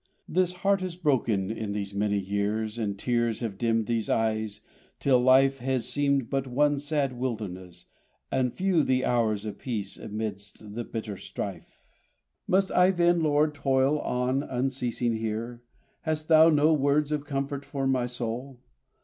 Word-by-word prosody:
This 180 +1 +1
heart 200 -1 +3
has 185 -2 -4
broken 120 - +1
in 110 -2 -4
these 100 -1 -4
many 100 0 0
years, 105 +3 -2
And 100 -3 -2
tears 120 0 0
have 105 -5 -4
dimmed 115 -2 +1
these 115 -2 -1
eyes, 110 -2 0 0.4
till 130 -3 +4
life 135 +2 +4
Has 130 -1 -1
seemed 140 -3 +1
but 135 -1 -2
one 145 +3 +2
sad 145 -2 -1
wilderness, 100 -8 -5 0.5
and 130 -2 +1
few 185 0 +2
The 130 -2 +1
hours 110 -4 +1
of 105 - -6
peace 105 -6 -4
amidst 105 -1 -6
the 120 +2 -3
bitter 110 -3 -5
strife! - - -7 0.6
Must 190 +1 +2
I, 180 +1 +5
then, 175 -2 +3
Lord, 150 0 +2
toil 135 +1 +2
on 125 +1 0
unceasing 125 -3 -1
here? 115 +2 -4 0.4
Hast 155 -1 -3
thou 160 0 +7
no 155 0 +4
words 145 +1 +2
of 150 -1 -1
comfort 140 0 -3
for 140 -1 -3
my 130 -2 +1
soul? 125 +2 -5
125 Hz, 155 wpm, -27 LUFS, 110-145 Hz, 0.6 s, thou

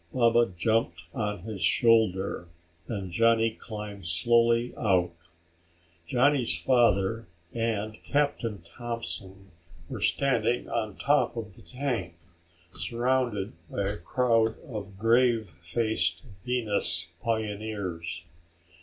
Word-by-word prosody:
Baba 120 -3 +3
jumped 90 -4 +1
on 105 -2 -2
his 110 -4 -6
shoulder 100 -2 +3 0.4
and 100 -5 -4
Johnny 115 +3 +3
climbed 105 -4 -7
slowly 115 +7 +3
out. 90 -6 +2 0.9
Johnny's 125 - +3
father 115 -3 +2 0.3
and 110 -2 -2
Captain 140 - -1
Thompson 100 -2 -6 0.4
were - - -5
standing 120 +6 +1
on 110 -4 -2
top 145 0 +2
of 110 -5 -6
the - - -13
tank, 110 -4 -3 0.6
surrounded 115 +3 0 0.2
by 100 - -2
a 105 - -3
crowd 115 +4 +1
of 105 - -7
grave 115 0 +3
faced 85 0 -1 0.2
Venus 105 -8 0
pioneers. 105 -7 -3
110 Hz, 100 wpm, -28 LUFS, 95-120 Hz, 0.9 s, Baba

